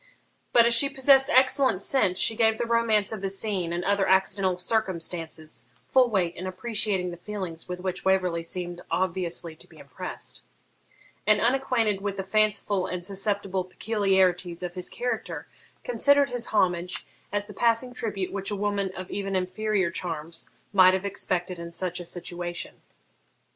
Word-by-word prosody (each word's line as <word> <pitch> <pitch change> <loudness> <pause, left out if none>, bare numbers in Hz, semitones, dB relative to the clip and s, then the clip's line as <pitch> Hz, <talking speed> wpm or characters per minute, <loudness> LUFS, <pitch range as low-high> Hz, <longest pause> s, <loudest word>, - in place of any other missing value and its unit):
But, 235 - +6
as 235 - +4
she 275 +4 +5
possessed 270 0 +4
excellent 255 -5 +4
sense, 205 -9 +2
she 225 - +4
gave 220 0 +3
the 235 - -1
romance 230 -3 +2
of 220 -3 -4
the 195 - -1
scene 195 -3 -1
and 175 +1 -2
other 200 -1 +2
accidental 190 -1 +2
circumstances 175 -5 -2 0.3
full 255 -2 +5
weight 185 -6 0
in 185 - -5
appreciating 190 -2 0
the 175 - -8
feelings 180 -3 -6
with 180 0 -4
which 185 0 -3
Waverley 185 -3 +2
seemed 175 +1 -3
obviously 175 -2 -1
to - - -10
be - - -18
impressed; - - -7 0.9
and, 210 -1 +5
unacquainted 235 -5 +1
with 200 -1 -3
the 195 - -2
fanciful 200 -1 +1
and 180 -1 -4
susceptible 195 -1 -1
peculiarities 185 -3 +1
of 175 -1 -4
his 180 -1 -4
character, 245 -2 -3 0.4
considered 285 - +3
his 245 -1 -3
homage 180 -3 0 0.3
as 205 0 -1
the 210 - -11
passing 235 +4 +1
tribute 210 -6 -3
which 195 0 -2
a 205 - -2
woman 200 -1 -1
of 185 0 -7
even 195 -1 -3
inferior 185 0 0
charms 165 -1 -4 0.2
might 185 -1 +7
have 190 +1 -3
expected 180 -2 -2
in 170 0 -6
such 175 +1 -3
a 175 - -7
situation. 175 0 -6
195 Hz, 160 wpm, -26 LUFS, 180-215 Hz, 0.9 s, might